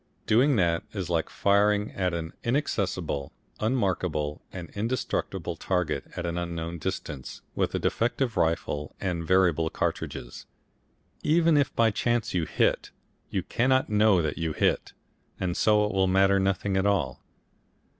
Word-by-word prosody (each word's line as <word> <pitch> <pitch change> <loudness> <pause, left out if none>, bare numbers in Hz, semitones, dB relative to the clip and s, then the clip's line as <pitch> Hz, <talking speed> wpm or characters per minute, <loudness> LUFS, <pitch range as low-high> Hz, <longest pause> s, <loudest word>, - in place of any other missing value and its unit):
Doing 130 +6 +4
that 85 -5 +2
is 95 -4 -4
like 80 -2 0
firing 105 +1 +2
at 90 -2 -1
an 85 -1 -4
inaccessible, 95 - -1 0.3
unmarkable 90 - -1
and 90 -3 -8
indestructible 100 -6 -2
target 90 +1 -1
at - - -3
an 85 0 -2
unknown 85 -1 -4
distance, 75 -6 -5
with - - -1
a - - +2
defective 120 +1 0
rifle 75 -3 -1
and 90 -3 -2
variable 85 -4 +3
cartridges. - - -4 0.7
Even 165 +1 +3
if 145 -2 +3
by 115 -1 +4
chance 120 +2 0
you 85 -3 +1
hit, - - +1 0.4
you - - -1
cannot 130 +2 +1
know 105 -4 +4
that 75 +1 -2
you 80 -2 -1
hit, - - 0 0.5
and 90 -2 -1
so 105 -1 +4
it 105 - -2
will 95 -1 +2
matter 95 +1 +4
nothing 95 0 0
at 95 +1 +2
all. 90 -11 0
95 Hz, 145 wpm, -27 LUFS, 85-105 Hz, 0.7 s, Doing